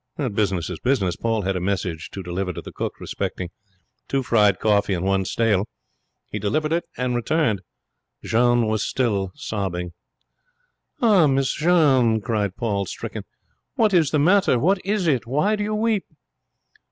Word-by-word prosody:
Business 95 -5 0
is 85 - -6
business. 115 -9 +1
Paul 115 -2 -1
had 95 +1 -1
a - - -1
message 90 -4 -2
to 95 - -7
deliver 90 +2 -3
to - - -6
the - - -9
cook - - -5
respecting 90 -2 -4 0.6
'two 135 -1 0
fried, 105 -5 +3
coffee, 100 -1 +2
and 90 +1 -3
one 95 -1 +1
stale'. 105 -1 +1 0.6
He 105 - -3
delivered 150 +10 -1
it 170 - 0
and 125 -1 -1
returned. 120 - +1 0.6
Jeanne 120 0 +3
was 110 -1 0
still 100 -8 0
sobbing. 95 -10 -4 1.1
'Ah, 200 -9 +5
Miss 135 -1 +1
Jeanne,' 140 -9 +3
cried 105 -3 -2
Paul, 100 -4 -1
stricken, - - -6 0.5
'what 215 -3 +2
is 165 -5 +4
the 155 - +1
matter? 180 -2 +4
What 185 +9 +1
is 200 -1 0
it? 130 -8 +1
Why 150 - +1
do 210 - -2
you 215 +1 -1
weep?' 220 -2 0
115 Hz, 160 wpm, -23 LUFS, 100-150 Hz, 1.1 s, Ah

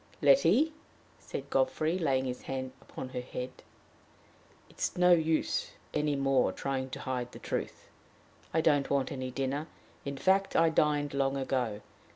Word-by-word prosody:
"Letty," 320 - +5 0.5
said 140 +1 -7
Godfrey, 135 +6 +1
laying 135 -5 +1
his 125 -1 -4
hand 130 -1 -4 0.3
on 130 - -4
her 125 -1 -4
head, 125 0 -5 1.2
"it - - -21
is - - -1
no 180 0 +5
use 160 -2 +2 0.2
any 150 -1 +1
more 135 -1 +2
trying 135 -1 -3
to - - -6
hide 125 -2 -3
the - - -8
truth. - - -4 0.6
I 160 - +2
don't 145 -3 +3
want 140 -2 +1
any 130 -2 -3
dinner; 135 +4 -2 0.4
in 140 0 -4
fact, 190 +7 +2
I 165 0 +5
dined 150 -2 +2
long 135 0 +1
ago. 125 -6 -1
135 Hz, 155 wpm, -31 LUFS, 130-155 Hz, 1.2 s, Letty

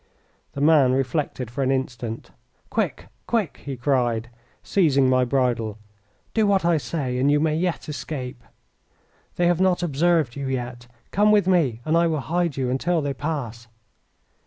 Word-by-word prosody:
The 140 - -5
man 145 -4 +5
reflected 130 -2 -2
for 135 - -3
an 130 - +1
instant. 125 -4 -3 0.4
"Quick! 90 +2 -2 0.2
quick!" 215 -10 0
he 135 -2 -5
cried, 120 -3 0 0.3
seizing 140 -8 +3
my 130 0 +3
bridle. 120 -5 0 0.6
"Do 220 -2 +2
what 195 -3 +2
I 170 -1 +4
say 130 -2 -3
and 135 +2 +3
you 145 0 +4
may 155 0 +1
yet 170 +1 -2
escape. 130 -4 -6 0.9
They 175 - +1
have 175 0 +2
not 180 -1 +2
observed 160 -4 +1
you 140 -1 -4
yet. 120 -2 -4 0.2
Come 210 +2 +4
with 210 -2 +4
me 150 -11 +2
and 155 - +1
I 170 0 +4
will 160 -2 0
hide 170 0 -1
you 130 -2 -1
until 165 +6 0
they 140 -1 -1
pass." 130 -6 -4
140 Hz, 160 wpm, -23 LUFS, 125-170 Hz, 0.9 s, man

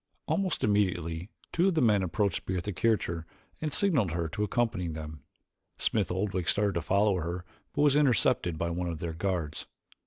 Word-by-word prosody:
Almost 195 -3 0
immediately 90 -4 0 0.2
two 175 +3 +3
of 190 - +2
the - - +3
men 105 -4 +4
approached 95 +2 -1
Bertha 95 +2 -2
Kircher 85 -5 0 0.3
and 155 -1 -1
signaled 140 - +2
her 85 -1 -1
to 105 - -2
accompany 105 -4 0
them. 80 -2 -6 0.6
Smith 105 -6 0
Oldwick 95 -2 -1
started 100 +4 +2
to 85 - -1
follow 100 +3 +2
her 85 +1 -4 0.3
but 145 - +3
was 145 -2 +5
intercepted 115 - +3
by 85 +1 -1
one 90 +1 -2
of 85 - -4
their 85 0 -4
guards. 85 -4 -2
95 Hz, 175 wpm, -29 LUFS, 85-105 Hz, 0.6 s, was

